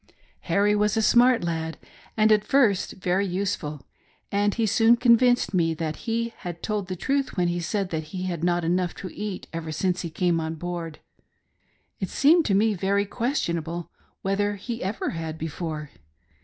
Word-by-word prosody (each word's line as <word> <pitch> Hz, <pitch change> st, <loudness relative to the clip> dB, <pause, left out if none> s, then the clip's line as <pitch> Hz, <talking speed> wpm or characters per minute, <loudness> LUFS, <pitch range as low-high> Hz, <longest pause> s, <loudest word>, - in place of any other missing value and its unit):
Harry 205 Hz, +1 st, +3 dB
was 210 Hz, +1 st, +1 dB
a -, -, +3 dB
smart 245 Hz, 0 st, +5 dB
lad 160 Hz, -1 st, -3 dB, 0.4 s
and 215 Hz, 0 st, +4 dB
at 210 Hz, -1 st, +4 dB
first 215 Hz, -5 st, +2 dB
very 185 Hz, +1 st, 0 dB
useful, 180 Hz, -7 st, -3 dB, 0.5 s
and 205 Hz, 0 st, +1 dB
he 230 Hz, -, +1 dB
soon 225 Hz, +2 st, +5 dB
convinced 245 Hz, -1 st, +4 dB
me 165 Hz, -3 st, +2 dB
that 155 Hz, -1 st, -3 dB
he 230 Hz, 0 st, -1 dB
had 175 Hz, -1 st, -7 dB
told 210 Hz, -3 st, -2 dB
the 185 Hz, -, -3 dB
truth 275 Hz, +6 st, -1 dB
when 175 Hz, -1 st, +2 dB
he 175 Hz, 0 st, -1 dB
said 195 Hz, +2 st, -2 dB
that 160 Hz, -1 st, -2 dB
he 185 Hz, +3 st, -6 dB
had 175 Hz, -3 st, -3 dB
not 175 Hz, 0 st, +1 dB
had 165 Hz, -, +1 dB
enough 180 Hz, -1 st, 0 dB
to 185 Hz, -, -7 dB
eat 205 Hz, -3 st, -5 dB
ever 165 Hz, -1 st, -4 dB
since 180 Hz, +3 st, 0 dB
he 170 Hz, -, -4 dB
came 170 Hz, +1 st, +1 dB
on 160 Hz, 0 st, -3 dB
board 170 Hz, -1 st, -5 dB, 0.5 s
— -, -, -43 dB
it 190 Hz, -, -3 dB
seemed 320 Hz, +4 st, +4 dB
to 200 Hz, -, +2 dB
me 215 Hz, +2 st, +3 dB
very 200 Hz, +2 st, +1 dB
questionable 170 Hz, -, -2 dB, 0.3 s
whether 205 Hz, +1 st, 0 dB
he 230 Hz, +4 st, -6 dB
ever 195 Hz, +4 st, -2 dB
had 160 Hz, -1 st, -5 dB
before. 155 Hz, -2 st, -5 dB
190 Hz, 185 wpm, -25 LUFS, 170-215 Hz, 0.5 s, smart